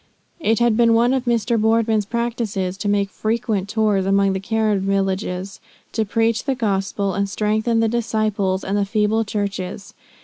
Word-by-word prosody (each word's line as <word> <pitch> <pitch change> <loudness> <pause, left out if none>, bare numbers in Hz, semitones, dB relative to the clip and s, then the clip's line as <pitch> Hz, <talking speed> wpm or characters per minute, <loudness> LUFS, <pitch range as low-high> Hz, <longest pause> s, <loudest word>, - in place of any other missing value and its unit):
It 225 -8 +1
had 235 -2 +3
been 230 0 +4
one 240 +3 +3
of 260 -1 -1
Mr. 235 -1 +1
Boardman's 220 -1 +2
practices 225 -5 -2
to 205 0 -2
make 200 -1 +1
frequent 215 -3 -1
tours 210 -3 +1
among 195 0 +3
the 190 - -2
Karen 215 0 0
villages, 195 -1 -2 0.3
to 220 -1 -1
preach 225 +2 0
the 270 -1 0
gospel, 200 -3 -1
and 200 +1 -1
strengthen 220 +3 0
the 225 - +3
disciples 215 -4 -1
and 195 - -2
the 205 - +2
feeble 215 +2 +1
churches. 200 -3 -4
215 Hz, 165 wpm, -21 LUFS, 195-225 Hz, 0.3 s, been